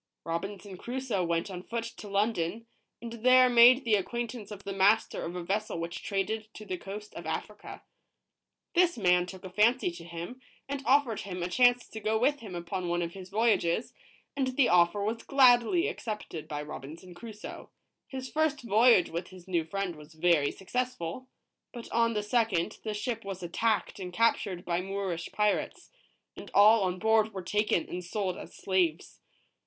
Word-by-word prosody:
Robinson 195 Hz, +3 st, -5 dB
Crusoe 240 Hz, -4 st, -2 dB
went 170 Hz, +2 st, -1 dB
on 180 Hz, -1 st, -6 dB
foot 230 Hz, +4 st, -4 dB
to 230 Hz, -2 st, -9 dB
London, 200 Hz, 0 st, -1 dB, 0.4 s
and 235 Hz, -1 st, -6 dB
there 255 Hz, 0 st, +7 dB
made 245 Hz, +2 st, +7 dB
the 225 Hz, -, +2 dB
acquaint 235 Hz, +3 st, -1 dB
ance 220 Hz, -5 st, -9 dB
of 200 Hz, -2 st, -9 dB
the 195 Hz, -, -4 dB
master 200 Hz, +3 st, +3 dB
of 170 Hz, +2 st, -5 dB
a 180 Hz, -, -4 dB
vessel 200 Hz, 0 st, -2 dB
which 170 Hz, +1 st, -5 dB
traded 215 Hz, +2 st, -2 dB
to 215 Hz, -, -9 dB
the 185 Hz, -, -3 dB
coast 210 Hz, +2 st, -8 dB
of -, -, -8 dB
Africa. -, -, -6 dB, 0.9 s
This 350 Hz, -3 st, +3 dB
man 180 Hz, -3 st, +3 dB
took 190 Hz, 0 st, -10 dB
a 185 Hz, -, -7 dB
fancy 220 Hz, +1 st, +3 dB
to 170 Hz, 0 st, -10 dB
him, 170 Hz, +9 st, -8 dB, 0.3 s
and 280 Hz, 0 st, -4 dB
offered 260 Hz, -4 st, +3 dB
him 180 Hz, -3 st, -5 dB
a -, -, -1 dB
chance 245 Hz, +5 st, +3 dB
to 220 Hz, -, -8 dB
go 220 Hz, +1 st, 0 dB
with 285 Hz, +5 st, +2 dB
him 205 Hz, -6 st, -8 dB
upon 175 Hz, +1 st, -4 dB
one 175 Hz, 0 st, 0 dB
of 170 Hz, 0 st, -5 dB
his 190 Hz, -1 st, -10 dB
voyages, 215 Hz, -2 st, +1 dB, 0.4 s
and 260 Hz, -2 st, -1 dB
the 275 Hz, -, +5 dB
offer 175 Hz, +3 st, +4 dB
was 225 Hz, +2 st, -2 dB
gladly 265 Hz, -, +4 dB
accepted 210 Hz, -, -5 dB
by 150 Hz, 0 st, -4 dB
Robinson 155 Hz, +4 st, -9 dB
Crusoe. 215 Hz, +3 st, -9 dB, 0.4 s
H 265 Hz, -, -5 dB
is -, -, -5 dB
first 305 Hz, -3 st, 0 dB
voyage 225 Hz, -3 st, +5 dB
with 170 Hz, +2 st, -4 dB
his 185 Hz, -1 st, -14 dB
new 175 Hz, -3 st, +1 dB
friend 185 Hz, +1 st, -3 dB
was 150 Hz, +1 st, -14 dB
very 160 Hz, -3 st, +3 dB
successful; 250 Hz, 0 st, -4 dB, 0.4 s
but 235 Hz, -1 st, -8 dB
on 230 Hz, 0 st, +2 dB
the 210 Hz, -, 0 dB
second, 210 Hz, -6 st, 0 dB
the 215 Hz, -1 st, -3 dB
ship 225 Hz, +2 st, -3 dB
was 195 Hz, -2 st, -6 dB
attacked 210 Hz, +6 st, -1 dB
and 180 Hz, -2 st, -6 dB
captured 195 Hz, -3 st, +1 dB
by 170 Hz, 0 st, 0 dB
Moorish 190 Hz, -3 st, -4 dB
pirates, 210 Hz, -1 st, -1 dB, 0.4 s
and -, -, -10 dB
all 215 Hz, +2 st, +7 dB
on 180 Hz, 0 st, -1 dB
board 220 Hz, +1 st, +2 dB
were 190 Hz, -, -4 dB
taken 210 Hz, -3 st, 0 dB
and 180 Hz, +1 st, -5 dB
sold 185 Hz, 0 st, -2 dB
as -, -, -10 dB
slaves. 180 Hz, -4 st, -1 dB
205 Hz, 180 wpm, -29 LUFS, 180-230 Hz, 0.9 s, there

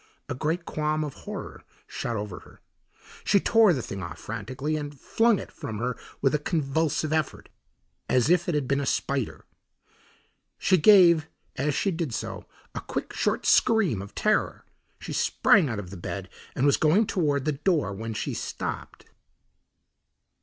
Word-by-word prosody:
A -, -, -3 dB
great 160 Hz, +6 st, -2 dB
qualm 155 Hz, 0 st, -1 dB
of 145 Hz, -3 st, -5 dB
horror -, -, -8 dB, 0.2 s
shot 120 Hz, -, -4 dB
over 105 Hz, -3 st, -5 dB
her. -, -, -18 dB, 0.6 s
She 200 Hz, -, +4 dB
tore 225 Hz, 0 st, +5 dB
the 130 Hz, -8 st, -1 dB
thing 100 Hz, -, -6 dB
off 85 Hz, -2 st, -6 dB
frantically 130 Hz, +9 st, -4 dB
and 145 Hz, -2 st, -5 dB
flung 225 Hz, -, +2 dB
it -, -, -8 dB
from 110 Hz, -, -6 dB
her 125 Hz, +2 st, -2 dB, 0.3 s
with 135 Hz, -, +3 dB
a 150 Hz, -, +2 dB
convulsive 155 Hz, 0 st, 0 dB
effort 155 Hz, -3 st, -2 dB, 0.6 s
as 125 Hz, -1 st, +3 dB
if 175 Hz, +2 st, +3 dB
it 170 Hz, -, 0 dB
had 145 Hz, -3 st, 0 dB
been 140 Hz, +1 st, +1 dB
a -, -, -2 dB
spider. 135 Hz, -4 st, -2 dB, 1.1 s
She 185 Hz, -, +3 dB
gave, 170 Hz, -4 st, +6 dB, 0.3 s
as 145 Hz, +2 st, 0 dB
she 195 Hz, -, +1 dB
did 165 Hz, -8 st, -3 dB
so, -, -, -5 dB, 0.3 s
a -, -, -4 dB
quick, -, -, -5 dB
short -, -, 0 dB
scream 195 Hz, -, +3 dB
of 100 Hz, +1 st, -11 dB
terror. 215 Hz, 0 st, 0 dB, 0.3 s
She -, -, -6 dB
sprang 180 Hz, -9 st, +3 dB
out 115 Hz, -, -3 dB
of 95 Hz, -3 st, -7 dB
bed -, -, -5 dB, 0.3 s
and 130 Hz, -, +1 dB
was 140 Hz, -, +4 dB
going 170 Hz, +9 st, +4 dB
toward 145 Hz, -8 st, 0 dB
the 155 Hz, -, +2 dB
door, 150 Hz, -, 0 dB
when 110 Hz, +2 st, -5 dB
she -, -, -3 dB
stopped. -, -, -5 dB
150 Hz, 165 wpm, -26 LUFS, 125-170 Hz, 1.1 s, gave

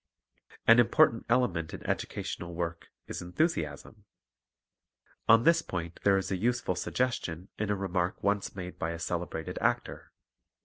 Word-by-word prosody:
An 115 Hz, +1 st, +8 dB
important 115 Hz, -1 st, +4 dB
element 95 Hz, -10 st, +1 dB
in -, -, -11 dB
educational 85 Hz, -1 st, -3 dB
work 85 Hz, -1 st, -4 dB, 0.2 s
is -, -, -5 dB
enthu 90 Hz, -, +2 dB
siasm. 75 Hz, -, -4 dB, 1.3 s
On 115 Hz, +1 st, +7 dB
this 165 Hz, +1 st, +5 dB
point 85 Hz, -, -5 dB
there 100 Hz, -1 st, +5 dB
is 95 Hz, -, -2 dB
a 95 Hz, -, +1 dB
useful 120 Hz, 0 st, 0 dB
suggestion 90 Hz, -3 st, -2 dB
in 105 Hz, -1 st, -1 dB
a 105 Hz, -, +2 dB
remark 95 Hz, -2 st, -2 dB
once 100 Hz, 0 st, 0 dB
made 90 Hz, -1 st, -7 dB
by 80 Hz, -, -1 dB
a -, -, -5 dB
celebrated 85 Hz, -1 st, -3 dB
actor. -, -, -1 dB
95 Hz, 145 wpm, -30 LUFS, 85-115 Hz, 1.3 s, An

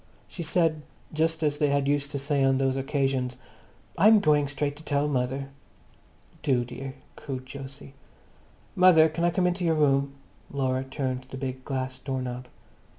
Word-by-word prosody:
She 175 Hz, -, -8 dB
said, 165 Hz, -1 st, +1 dB, 0.3 s
just 160 Hz, +1 st, 0 dB
as 150 Hz, -1 st, 0 dB
they 150 Hz, -, +3 dB
had 140 Hz, -1 st, +1 dB
used 145 Hz, 0 st, +1 dB
to 145 Hz, -, -3 dB
say 140 Hz, 0 st, 0 dB
on 135 Hz, 0 st, +3 dB
those 135 Hz, -1 st, +1 dB
occasions, 135 Hz, -2 st, -1 dB, 0.6 s
"I'm 215 Hz, +4 st, +7 dB
going 150 Hz, -5 st, +3 dB
straight 140 Hz, +1 st, -1 dB
up -, -, -17 dB
to 155 Hz, -, -13 dB
tell 145 Hz, -1 st, 0 dB
mother." 135 Hz, 0 st, -1 dB, 0.9 s
"Do, 130 Hz, -5 st, +1 dB
dear," 135 Hz, +2 st, -7 dB, 0.2 s
cooed 130 Hz, -2 st, -6 dB
Jose. 135 Hz, 0 st, -9 dB, 0.8 s
"Mother, 180 Hz, -3 st, +7 dB
can 165 Hz, +2 st, -3 dB
I 175 Hz, -, +4 dB
come 180 Hz, +1 st, +1 dB
into 180 Hz, +1 st, 0 dB
your 165 Hz, -2 st, +2 dB
room?" 140 Hz, -2 st, +2 dB, 0.4 s
Laura 130 Hz, -1 st, -1 dB
turned 130 Hz, -2 st, -3 dB
the 130 Hz, -, -7 dB
big 130 Hz, -1 st, -5 dB
glass 130 Hz, -1 st, -3 dB
door 135 Hz, -2 st, -3 dB
knob. 125 Hz, 0 st, -5 dB
140 Hz, 170 wpm, -27 LUFS, 130-155 Hz, 0.9 s, I'm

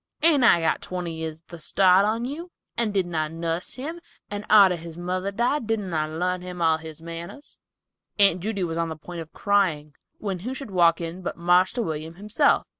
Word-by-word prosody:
Ain't 310 Hz, -5 st, +6 dB
I 175 Hz, -7 st, +6 dB
got 160 Hz, -, +1 dB
twenty 180 Hz, -2 st, -4 dB
years 160 Hz, -1 st, -5 dB
the 170 Hz, -, -9 dB
start 185 Hz, +4 st, +4 dB
on 225 Hz, +3 st, 0 dB
you; 320 Hz, +7 st, -6 dB, 0.3 s
and 230 Hz, -3 st, 0 dB
didn't 185 Hz, -3 st, -1 dB
I 155 Hz, -1 st, 0 dB
nuss 165 Hz, +2 st, -3 dB
him, 315 Hz, +7 st, -6 dB, 0.3 s
and 205 Hz, 0 st, -4 dB
arter 200 Hz, -4 st, +7 dB
his 165 Hz, 0 st, -9 dB
mother 185 Hz, +2 st, -2 dB
died 235 Hz, +5 st, 0 dB
didn't 210 Hz, -5 st, -2 dB
I 155 Hz, -1 st, 0 dB
larn 180 Hz, +3 st, -2 dB
him 180 Hz, 0 st, -7 dB
all 160 Hz, -1 st, +3 dB
his 160 Hz, 0 st, -10 dB
manners?" 170 Hz, -, -8 dB, 0.6 s
Aunt 200 Hz, -3 st, +5 dB
Judy 200 Hz, -1 st, -2 dB
was 165 Hz, -1 st, -2 dB
on 165 Hz, 0 st, 0 dB
the 160 Hz, -, -5 dB
point 170 Hz, +2 st, -8 dB
of 160 Hz, -, -10 dB
crying, 175 Hz, -8 st, +1 dB, 0.2 s
when 195 Hz, -4 st, -3 dB
who 250 Hz, +8 st, -5 dB
should 265 Hz, -6 st, -7 dB
walk 170 Hz, -2 st, +4 dB
in 170 Hz, +2 st, -5 dB
but 180 Hz, -, -4 dB
"Marster 180 Hz, +7 st, +3 dB
William" 160 Hz, -2 st, -4 dB
himself. 210 Hz, -, +2 dB
180 Hz, 200 wpm, -25 LUFS, 165-210 Hz, 0.6 s, arter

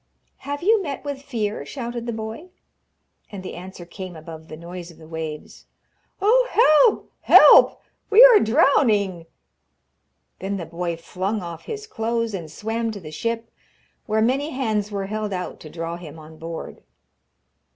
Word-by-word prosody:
'Have 285 Hz, +3 st, -6 dB
you 435 Hz, +2 st, +4 dB
met 285 Hz, -7 st, -5 dB
with 285 Hz, -1 st, -4 dB
fear?' 225 Hz, -6 st, -3 dB
shouted 240 Hz, -3 st, -6 dB
the -, -, -1 dB
boy. 220 Hz, +10 st, -7 dB, 0.8 s
And 195 Hz, -3 st, -8 dB
the -, -, -7 dB
answer 180 Hz, 0 st, -9 dB
came 185 Hz, 0 st, -8 dB
above 160 Hz, 0 st, -10 dB
the 155 Hz, -, -9 dB
noise 175 Hz, +1 st, -9 dB
of 170 Hz, -, -15 dB
the 160 Hz, -, -14 dB
waves. 160 Hz, -2 st, -7 dB, 0.5 s
'Oh, 485 Hz, +6 st, +4 dB
help! 440 Hz, +1 st, +4 dB
help! -, -, +7 dB, 0.3 s
We 445 Hz, +4 st, +9 dB
are 480 Hz, -4 st, +8 dB
drowning!' 215 Hz, -, +2 dB, 1.1 s
Then 195 Hz, +1 st, -3 dB
the 170 Hz, -, -5 dB
boy 170 Hz, +1 st, -4 dB
flung 190 Hz, +5 st, -3 dB
off 170 Hz, -1 st, -8 dB
his 430 Hz, -1 st, -6 dB
clothes, 230 Hz, -, -2 dB
and 170 Hz, -5 st, -5 dB
swam 225 Hz, +6 st, -3 dB
to 205 Hz, -, -7 dB
the 155 Hz, -4 st, -10 dB
ship, 230 Hz, +7 st, -3 dB, 0.6 s
where 220 Hz, 0 st, +2 dB
many 270 Hz, +6 st, +1 dB
hands 220 Hz, -7 st, -1 dB
were 200 Hz, -2 st, -3 dB
held 215 Hz, 0 st, -3 dB
out 180 Hz, -1 st, -5 dB
to 155 Hz, -, -11 dB
draw 165 Hz, +2 st, -5 dB
him 165 Hz, -3 st, -11 dB
on 155 Hz, 0 st, -13 dB
board. 165 Hz, 0 st, -7 dB
210 Hz, 160 wpm, -23 LUFS, 170-255 Hz, 1.1 s, We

